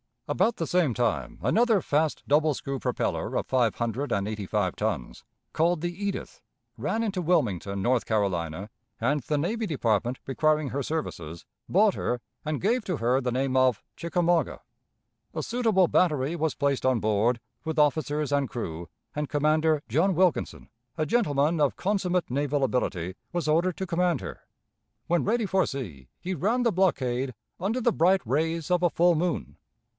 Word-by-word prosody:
About 235 - +2
the 165 - -2
same 165 -5 +2
time 80 - -1
another 225 - +3
fast 155 +1 0
double 150 +1 +3
screw 135 0 -4
propeller - - -2
of - - 0
five 125 -4 +2
hundred 120 +4 -2
and 100 0 0
eighty 105 -2 -4
five - - 0
tons, - - -3 0.3
called 170 0 +2
the 175 0 -2
Edith, 200 +2 -5 0.4
ran 225 +1 -1
into 200 -4 -1
Wilmington, 100 - 0
North 125 +3 +1
Carolina, 95 -3 -1 0.3
and 140 +6 +1
the 150 - -1
Navy 215 +10 -1
Department 120 - 0
requiring 155 +1 +1
her 140 - -2
services, 85 - -4 0.2
bought 205 +2 +4
her 120 -1 -2 0.2
and 155 -1 -2
gave 225 +3 +1
to 180 -5 -1
her 125 +2 +2
the 125 -1 -1
name 130 +1 0
of 130 -4 +3
"Chickamauga." 170 0 0 0.7
A - - -2
suitable 220 -7 +2
battery 150 -3 +2
was 160 -1 0
placed 140 -3 0
on 130 -4 +2
board, 110 +3 +1 0.2
with 160 0 -3
officers 150 0 +1
and 140 -2 +1
crew, 85 -8 -5 0.3
and 150 -1 -3
Commander 155 +1 +2
John 165 - +2
Wilkinson, 180 -1 +1 0.3
a 155 - +1
gentleman 155 - +2
of 145 -2 +2
consummate 185 -5 0
naval 145 +1 0
ability, 95 -9 -1 0.2
was 175 -3 -1
ordered 170 +3 +2
to 190 - -2
command 175 -3 +1
her. - - -9 0.6
When 175 0 +1
ready 225 +1 +1
for 190 -1 +2
sea, 85 - -6
he 185 - -3
ran 220 - +1
the 235 - +3
blockade 135 - 0 0.2
under 215 +8 -1
the 235 -1 +2
bright 185 +3 +3
rays 160 +6 -1
of 180 -1 +3
a 175 - +4
full 175 +2 +4
moon. 165 - -2
150 Hz, 165 wpm, -27 LUFS, 125-180 Hz, 0.7 s, bought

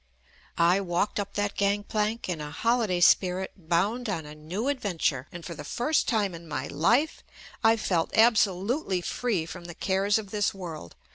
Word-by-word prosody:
I 175 +4 +4
walked 180 +3 -1
up 200 0 -4
that 205 0 0
gangplank 210 +2 0
in 170 -4 -3
a 150 - -5
holiday 215 +1 +1
spirit 185 +1 +4
bound 195 +8 0
on 165 -6 -2
a 150 - -9
new 170 - -4
adventure, 180 - -1
and 170 -2 -9
for 170 - -5
the 165 - -8
first 290 +5 0
time 210 -5 +1
in 170 0 -10
my 145 -3 -3
life 235 - +1 0.4
I 225 0 +5
felt 175 -6 -1
absolutely 210 - +3
free 200 -3 -1
from 175 +1 -9
the 170 -1 -8
cares 195 +3 +1
of 205 -3 -6
this 205 -2 0
world. 165 - -8
195 Hz, 170 wpm, -27 LUFS, 170-215 Hz, 0.4 s, I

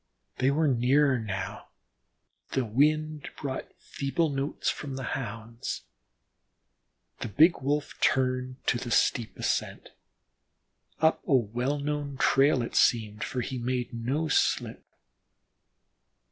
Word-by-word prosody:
They 130 - +3
were 155 +3 +2
nearer 130 +1 +3
now, 100 -1 -5 0.9
the 130 - +1
wind 150 +6 +1
brought 135 -2 -4
feeble 150 +4 -1
notes 140 +1 -3
from 140 -3 -2
the 135 - -5
Hounds. 115 -2 -5 1.4
The - - -3
big 160 - +4
Wolf 145 +2 -1
turned 130 0 +1
to 120 - +2
the 120 - -5
steep 115 0 +1
ascent, - - -2 1.1
up 160 0 +3
a 140 - +4
well 125 +4 0
known 145 -1 -3
trail, 135 -1 +4
it - - -6
seemed, 105 -3 +2
for 130 -1 -2
he 130 +1 -4
made 125 0 -2
no 130 +7 -1
slip. 145 - +1
130 Hz, 120 wpm, -28 LUFS, 120-145 Hz, 1.4 s, big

